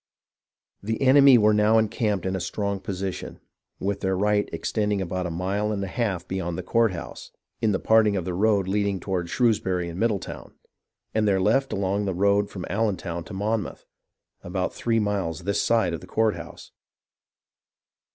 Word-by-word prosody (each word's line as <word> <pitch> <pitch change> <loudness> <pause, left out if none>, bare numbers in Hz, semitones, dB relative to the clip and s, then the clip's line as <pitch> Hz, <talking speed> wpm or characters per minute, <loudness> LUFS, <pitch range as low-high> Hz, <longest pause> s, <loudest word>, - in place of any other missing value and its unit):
The 110 +2 -3
enemy 135 0 +7
were 105 -1 +4
now 105 +1 +4
encamped 105 -2 0
in 95 0 -1
a - - -2
strong 100 +2 -2
position, 95 -1 -5 0.4
with 100 +1 -2
their 95 -1 -1
right 105 +1 +1
extending 105 -2 -1
about 95 -1 -2
a - - -4
mile 95 +5 -1
and 100 -2 -2
a - - -3
half 95 -4 -2
beyond 85 -3 -3
the 90 - -4
courthouse, 105 -3 -1 0.3
in 110 -2 +2
the 95 - +1
parting 110 -1 +3
of 90 -3 -2
the 90 - -3
road 100 0 +2
leading 100 0 0
to 90 -3 -2
Shrewsbury 95 -5 +1
and 85 +2 -7
Middletown, 110 -3 -2 0.6
and 110 -1 +1
their 95 -2 +3
left 135 +8 +2
along 100 +1 -1
the 95 -2 -2
road 100 +2 +2
from 90 - -6
AUentown 95 -4 -2
to - - -9
Monmouth, 105 +2 -2 0.6
about 90 +1 -2
three 115 -1 0
miles 100 -7 -1
this 100 0 0
side 115 -7 +2
of 85 - -5
the - - -12
courthouse. 90 -7 -2
100 Hz, 170 wpm, -25 LUFS, 95-110 Hz, 0.6 s, enemy